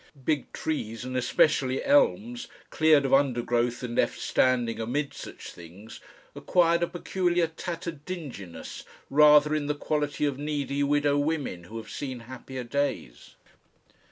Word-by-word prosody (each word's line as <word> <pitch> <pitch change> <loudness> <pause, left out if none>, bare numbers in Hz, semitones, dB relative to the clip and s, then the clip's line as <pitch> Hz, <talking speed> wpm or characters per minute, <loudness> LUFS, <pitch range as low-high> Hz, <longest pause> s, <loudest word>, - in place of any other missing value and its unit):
Big 150 -3 0
trees, 120 -7 -4
and 130 0 -5
especially 130 +1 +2
elms, 245 -4 +2 0.2
cleared 155 -3 +4
of 135 - 0
undergrowth 120 -3 +1
and 120 -1 -4
left - - +1
standing 120 -3 +1
amid 140 +6 -2
such - - -9
things, 90 +6 -12 0.3
acquired 170 -1 +2
a 170 - +2
peculiar 175 0 0
tattered 165 -1 -6
dinginess 130 - -7 0.3
rather 150 +1 +6
in 150 -2 -1
the 150 - 0
quality 150 0 -1
of 140 -2 -2
needy 145 -1 -2
widow 145 0 +2
women 145 - -2
who 110 +6 -8
have 115 - -8
seen 130 -4 -5
happier 130 +1 -8
days. 125 - -3
145 Hz, 135 wpm, -27 LUFS, 125-155 Hz, 0.3 s, rather